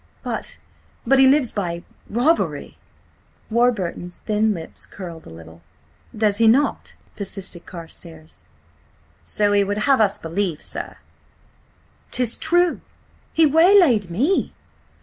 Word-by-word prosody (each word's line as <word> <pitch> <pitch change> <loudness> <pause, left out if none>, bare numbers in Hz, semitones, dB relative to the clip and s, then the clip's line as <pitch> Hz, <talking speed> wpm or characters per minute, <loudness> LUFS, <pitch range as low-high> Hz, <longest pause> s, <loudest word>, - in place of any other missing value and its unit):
"But–but 265 +3 -3
he 265 - +7
lives 265 -3 +3
by–robbery!" 205 - -2 0.7
Warburton's 205 -7 0
thin 215 0 0
lips 165 -5 -6
curled 170 -4 -9
a - - -10
little. 80 0 -13 0.6
"Does 210 -2 +2
he 230 0 +4
not?" 265 +6 +1 0.2
persisted 195 -3 -5
Carstares. 165 -2 -10 0.8
"So 205 -1 0
he 200 0 +4
would 205 +1 -2
have 270 -4 +4
us 205 -1 +2
believe, 170 -2 -3
sir." - - -4 1.1
"'Tis 245 -2 0
true! 350 0 +2 0.5
He–waylaid 320 - +5
me!" 270 - 0
210 Hz, 105 wpm, -21 LUFS, 175-260 Hz, 1.1 s, he